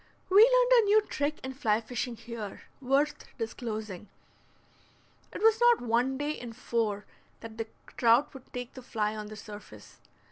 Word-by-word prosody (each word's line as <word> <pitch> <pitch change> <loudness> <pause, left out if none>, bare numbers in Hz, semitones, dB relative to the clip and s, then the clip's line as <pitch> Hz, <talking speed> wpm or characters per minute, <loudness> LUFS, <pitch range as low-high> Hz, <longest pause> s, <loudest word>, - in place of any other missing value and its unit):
We 385 - +4
learned - - +5
a - - -1
new 420 +1 +5
trick 295 -6 -2
in 265 0 -5
fly 225 -6 +1
fishing 240 +1 -4
here, 225 -3 -8 0.2
worth 275 +3 +1
disclosing. 220 -4 -5 1.2
It - - -6
was 450 +1 +5
not 480 -1 +6
one 245 +3 +1
day 290 +2 -1
in 240 -6 -7
four 220 -4 -2 0.4
that 225 0 -10
the 225 - -3 0.3
trout 235 +4 +4
would 270 -2 -13
take 245 0 -6
the 260 - -10
fly 215 -3 -2
on 210 -1 -6
the 215 - -9
surface. 205 - -12
240 Hz, 165 wpm, -29 LUFS, 220-285 Hz, 1.2 s, not